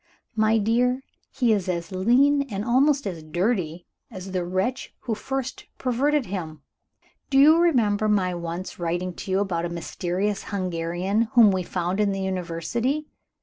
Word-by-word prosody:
My 220 Hz, 0 st, +3 dB
dear, 245 Hz, +4 st, +1 dB, 0.3 s
he 245 Hz, -4 st, +2 dB
is 195 Hz, -3 st, -1 dB
as 170 Hz, -1 st, -3 dB
lean, 250 Hz, +10 st, +3 dB
and 200 Hz, +1 st, -3 dB
almost 275 Hz, +3 st, +3 dB
as 175 Hz, -5 st, -4 dB
dirty, 175 Hz, 0 st, -1 dB, 0.2 s
as 190 Hz, -3 st, -8 dB
the 185 Hz, -1 st, -1 dB
wretch 190 Hz, +9 st, -2 dB
who 230 Hz, -, -2 dB
first 265 Hz, +3 st, -4 dB
perverted 265 Hz, +3 st, +1 dB
him. 160 Hz, -6 st, -6 dB, 0.7 s
Do 270 Hz, -, +2 dB
you 310 Hz, +4 st, +7 dB
remember 220 Hz, -11 st, +3 dB
my 190 Hz, -3 st, +2 dB
once 170 Hz, +2 st, -5 dB
writing 175 Hz, +2 st, -2 dB
to 195 Hz, -, -8 dB
you 190 Hz, +1 st, +2 dB
about 175 Hz, -4 st, -1 dB
a -, -, -3 dB
mysterious 180 Hz, +4 st, -2 dB
Hungarian, 185 Hz, +3 st, -1 dB
whom 230 Hz, -5 st, +7 dB
we 190 Hz, -1 st, 0 dB
found 180 Hz, +2 st, -2 dB
in 205 Hz, -2 st, +2 dB
the 195 Hz, -, -3 dB
University? 190 Hz, -, -2 dB
195 Hz, 155 wpm, -24 LUFS, 180-240 Hz, 0.7 s, you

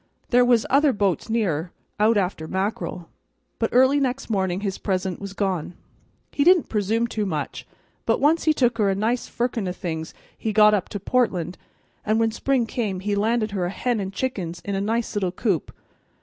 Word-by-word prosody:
There 245 Hz, 0 st, +6 dB
was 245 Hz, -2 st, +3 dB
other 280 Hz, +1 st, +4 dB
bo'ts 200 Hz, -1 st, 0 dB
near, 185 Hz, -8 st, 0 dB, 0.3 s
out 215 Hz, +1 st, +4 dB
after 180 Hz, -5 st, -1 dB
mackerel. 185 Hz, -3 st, -3 dB, 0.5 s
But 225 Hz, -, +1 dB
early 260 Hz, +3 st, +5 dB
next 260 Hz, -2 st, -2 dB
morning 190 Hz, -2 st, 0 dB
his 195 Hz, -2 st, -3 dB
present 190 Hz, -2 st, -2 dB
was 200 Hz, -1 st, -6 dB
gone. 185 Hz, -4 st, -2 dB, 0.6 s
He 285 Hz, -, +1 dB
didn't 355 Hz, 0 st, +5 dB
presume 220 Hz, +2 st, +1 dB
too 220 Hz, -2 st, -2 dB
much, 155 Hz, -5 st, -4 dB, 0.4 s
but -, -, +2 dB
once 315 Hz, +4 st, +3 dB
he 315 Hz, -, +5 dB
took 245 Hz, -5 st, +1 dB
her 205 Hz, -2 st, +3 dB
a 195 Hz, -, +1 dB
nice 225 Hz, +5 st, 0 dB
firkin 235 Hz, -4 st, -2 dB
o' -, -, -1 dB
things 160 Hz, -3 st, -5 dB, 0.2 s
he 220 Hz, -, -3 dB
got 210 Hz, 0 st, +6 dB
up 200 Hz, -4 st, 0 dB
to 205 Hz, -, -4 dB
Portland, 185 Hz, -6 st, 0 dB, 0.5 s
and 215 Hz, +1 st, +1 dB
when 225 Hz, 0 st, +2 dB
spring 255 Hz, +2 st, +1 dB
come 210 Hz, -5 st, -3 dB
he 205 Hz, +1 st, -1 dB
landed 215 Hz, +1 st, +1 dB
her 190 Hz, -3 st, -1 dB
a -, -, -1 dB
hen 240 Hz, +4 st, -1 dB
and 190 Hz, -1 st, -3 dB
chickens 185 Hz, -7 st, -3 dB
in 200 Hz, -, -2 dB
a 195 Hz, -, -1 dB
nice 225 Hz, +2 st, -1 dB
little 190 Hz, -3 st, 0 dB
coop. 185 Hz, -, -1 dB
210 Hz, 190 wpm, -24 LUFS, 190-235 Hz, 0.6 s, There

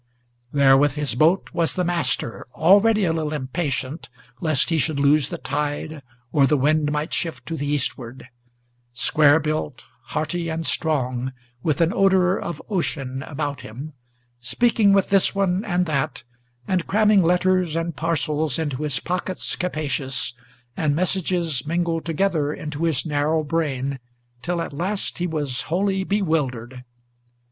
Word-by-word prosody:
There 140 Hz, -2 st, +5 dB
with 145 Hz, 0 st, +2 dB
his 150 Hz, -2 st, 0 dB
boat 160 Hz, +9 st, +2 dB
was 165 Hz, -1 st, 0 dB
the 180 Hz, -, 0 dB
Master, 165 Hz, -11 st, -1 dB
already 205 Hz, +5 st, +5 dB
a 165 Hz, -, +1 dB
little 155 Hz, -2 st, -2 dB
impatient 145 Hz, +1 st, -3 dB, 0.3 s
Lest 155 Hz, +1 st, +2 dB
he 165 Hz, -, +2 dB
should 150 Hz, 0 st, 0 dB
lose 145 Hz, 0 st, +3 dB
the -, -, -4 dB
tide, 145 Hz, +1 st, -3 dB, 0.3 s
or 140 Hz, -2 st, +4 dB
the 150 Hz, -, +3 dB
wind 150 Hz, +2 st, +2 dB
might 150 Hz, +2 st, -2 dB
shift 165 Hz, -3 st, -2 dB
to 165 Hz, -, -4 dB
the 145 Hz, -2 st, -3 dB
eastward, 130 Hz, -4 st, -2 dB, 0.7 s
Square 150 Hz, +5 st, +4 dB
built, 155 Hz, -3 st, -3 dB, 0.2 s
hearty, 165 Hz, +2 st, -2 dB
and 165 Hz, 0 st, -3 dB
strong, 130 Hz, -5 st, -1 dB, 0.3 s
with 155 Hz, +1 st, 0 dB
an 165 Hz, +2 st, +3 dB
odor 190 Hz, -1 st, +3 dB
of 170 Hz, -, -5 dB
ocean 135 Hz, -9 st, -2 dB
about 145 Hz, -2 st, -4 dB
him, 135 Hz, +8 st, -8 dB, 0.5 s
Speaking 205 Hz, -, +2 dB
with 195 Hz, -1 st, +3 dB
this 195 Hz, 0 st, +4 dB
one 195 Hz, 0 st, +1 dB
and 180 Hz, -3 st, 0 dB
that, 150 Hz, -3 st, -2 dB, 0.4 s
and 185 Hz, -3 st, 0 dB
cramming 210 Hz, -1 st, +4 dB
letters 180 Hz, -1 st, +2 dB
and 165 Hz, -1 st, -2 dB
parcels 155 Hz, -2 st, 0 dB
Into 145 Hz, -5 st, -2 dB
his 145 Hz, -3 st, 0 dB
pockets 180 Hz, +1 st, -3 dB
capacious, 140 Hz, -8 st, -2 dB, 0.4 s
and 150 Hz, -3 st, +1 dB
messages 170 Hz, -5 st, -1 dB
mingled 170 Hz, 0 st, -1 dB
together 165 Hz, -3 st, 0 dB
Into 150 Hz, +1 st, -4 dB
his 160 Hz, -2 st, 0 dB
narrow 155 Hz, +1 st, +1 dB
brain, 140 Hz, -4 st, -2 dB, 0.4 s
till 175 Hz, +3 st, -2 dB
at -, -, -7 dB
last 185 Hz, +6 st, -2 dB
he 175 Hz, -, 0 dB
was 145 Hz, -6 st, -2 dB
wholly 190 Hz, +3 st, +1 dB
bewildered. 135 Hz, -, -1 dB
155 Hz, 145 wpm, -23 LUFS, 145-175 Hz, 0.7 s, There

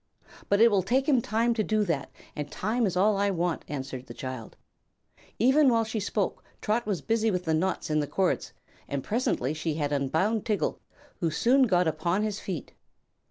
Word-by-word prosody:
"But 200 Hz, -, +3 dB
it 230 Hz, +1 st, +7 dB
will 200 Hz, -2 st, +3 dB
take 255 Hz, +8 st, +1 dB
him 265 Hz, -5 st, +4 dB
time 230 Hz, +2 st, +1 dB
to 220 Hz, -2 st, 0 dB
do 215 Hz, 0 st, +1 dB
that, 165 Hz, -8 st, -2 dB, 0.3 s
and 150 Hz, -1 st, -4 dB
time 220 Hz, +3 st, 0 dB
is 185 Hz, -1 st, -2 dB
all 205 Hz, +2 st, +3 dB
I 200 Hz, 0 st, +2 dB
want," 175 Hz, -3 st, -1 dB
answered 130 Hz, -2 st, -6 dB
the 120 Hz, -, -9 dB
child. 130 Hz, -4 st, -7 dB, 0.8 s
Even 265 Hz, +5 st, +5 dB
while 230 Hz, -2 st, +3 dB
she 220 Hz, 0 st, -3 dB
spoke 205 Hz, 0 st, -2 dB, 0.2 s
Trot 220 Hz, +2 st, -1 dB
was 200 Hz, -5 st, -2 dB
busy 225 Hz, 0 st, +1 dB
with 180 Hz, -3 st, -1 dB
the 160 Hz, -, +1 dB
knots 170 Hz, 0 st, -1 dB
in 155 Hz, -, +2 dB
the 145 Hz, -, -1 dB
cords, 185 Hz, +5 st, 0 dB, 0.4 s
and 140 Hz, -2 st, -3 dB
presently 205 Hz, -, 0 dB
she 160 Hz, 0 st, -2 dB
had 145 Hz, -2 st, -1 dB
unbound 160 Hz, +11 st, +1 dB
Tiggle, 215 Hz, -4 st, -1 dB, 0.4 s
who 170 Hz, -4 st, +1 dB
soon 255 Hz, -, +3 dB
got 180 Hz, -4 st, +3 dB
upon 170 Hz, +6 st, 0 dB
his 210 Hz, -1 st, -2 dB
feet. 180 Hz, -6 st, -6 dB
195 Hz, 195 wpm, -27 LUFS, 155-225 Hz, 0.8 s, it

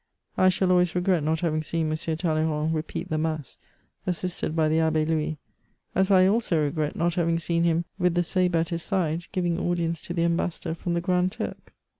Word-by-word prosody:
I 185 Hz, -, +5 dB
shall 185 Hz, 0 st, +1 dB
always 180 Hz, -1 st, +3 dB
regret 180 Hz, -1 st, +2 dB
not 160 Hz, +2 st, 0 dB
having 155 Hz, -3 st, 0 dB
seen 155 Hz, 0 st, -1 dB
M. -, -, +1 dB
Talleyrand 155 Hz, -1 st, 0 dB
repeat 155 Hz, 0 st, -4 dB
the 155 Hz, -, +1 dB
mass, 155 Hz, -3 st, -3 dB, 0.5 s
assisted 180 Hz, -2 st, -2 dB
by 160 Hz, -1 st, +3 dB
the 160 Hz, +1 st, +2 dB
Abbe 160 Hz, -1 st, +2 dB
Louis, 155 Hz, -1 st, -1 dB, 0.6 s
as 190 Hz, +1 st, +2 dB
I 185 Hz, -2 st, +6 dB
also 195 Hz, -4 st, +2 dB
regret 150 Hz, 0 st, -1 dB
not 170 Hz, +1 st, +1 dB
having 170 Hz, -1 st, +1 dB
seen 170 Hz, 0 st, 0 dB
him, 170 Hz, 0 st, +1 dB
with 180 Hz, -1 st, +2 dB
the 175 Hz, -, +3 dB
sabre 180 Hz, 0 st, +1 dB
at 165 Hz, 0 st, 0 dB
his 170 Hz, -1 st, -2 dB
side, 175 Hz, -2 st, -1 dB
giving 175 Hz, -3 st, 0 dB
audience 170 Hz, -2 st, -1 dB
to 175 Hz, -, -6 dB
the 170 Hz, -, +1 dB
ambassador 170 Hz, -1 st, -1 dB
from 170 Hz, +1 st, -3 dB
the 170 Hz, -, 0 dB
Grand 180 Hz, 0 st, +1 dB
Turk. -, -, -6 dB
170 Hz, 200 wpm, -26 LUFS, 160-180 Hz, 0.6 s, I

